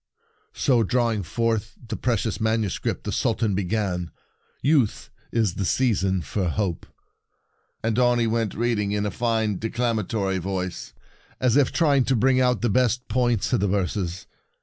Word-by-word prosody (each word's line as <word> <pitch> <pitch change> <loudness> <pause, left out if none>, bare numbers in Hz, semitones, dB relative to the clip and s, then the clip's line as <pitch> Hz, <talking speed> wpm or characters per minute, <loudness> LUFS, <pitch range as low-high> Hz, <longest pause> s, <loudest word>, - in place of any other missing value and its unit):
So, 125 -4 +3
drawing 115 -1 +1
forth 115 +4 -1 0.2
the 110 - -2
pre 120 -1 0
cious 110 +1 -3
manuscript, 110 -2 -1
the - - -3
Sultan 110 -3 0
began, 95 -3 -1 0.3
" - - -41
Youth 135 -5 +1 0.2
is 110 -6 +1
the 100 - -3
season 95 -5 +1
for 90 +5 -2
hope," 95 -2 -2 1.0
and 115 +1 +1
on 120 -1 +4
he 120 - +2
went, 115 -1 -1
reading 105 -3 0
in 105 0 0
a 105 - -1
fine 110 -2 0
declamatory 110 -4 -1
voice, 95 -4 -4 0.5
as 125 -2 +2
if 140 -3 +4
trying 145 -6 +3
to 130 - +2
bring 130 +3 +3
out 125 -1 +2
the - - +3
best 125 +2 +1
points 120 -1 +1
in 125 - +3
the 100 - +1
verses. 95 -2 -2
110 Hz, 160 wpm, -24 LUFS, 100-120 Hz, 1.0 s, on